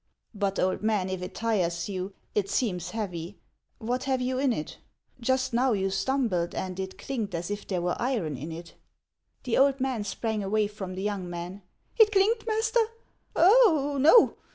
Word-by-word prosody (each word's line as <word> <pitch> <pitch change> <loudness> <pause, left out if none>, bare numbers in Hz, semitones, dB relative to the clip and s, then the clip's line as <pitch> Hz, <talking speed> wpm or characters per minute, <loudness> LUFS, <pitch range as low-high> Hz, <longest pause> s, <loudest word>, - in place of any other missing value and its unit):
" - - -55
But, 200 -2 -1
old 185 0 +1
man, 210 -3 0
if 185 -1 -3
it 180 - -7
tires 175 -7 0
you? 190 0 -4 0.2
It 200 -2 0
seems 185 -5 -1
heavy. 180 -3 -5 0.4
What 245 +3 -2
have 265 -1 +1
you 255 +1 -1
in 270 -1 +2
it? 155 -9 -4 0.4
Just 260 +1 0
now 250 +1 +3
you 195 -1 0
stumbled, 195 -4 0
and 185 0 -4
it 190 0 -5
clinked 220 -9 -4
as 170 +3 -4
if 205 0 -5
there 180 -3 -1
were 175 - 0
iron 225 - -1
in 150 +6 -6
it." 170 +1 -9 0.7
The 245 -1 +1
old 275 0 +4
man 260 -5 -1
sprang 215 +1 -2
away 210 +2 +1
from 200 -3 -6
the 190 - -4
young 200 -4 -2
man. 175 +3 -6 0.2
" - - -34
It 430 -1 +7
clinked, 435 +3 +2
master? 445 +2 +1 0.6
Oh, 335 - +5
no 325 - +6
210 Hz, 185 wpm, -27 LUFS, 185-260 Hz, 0.7 s, It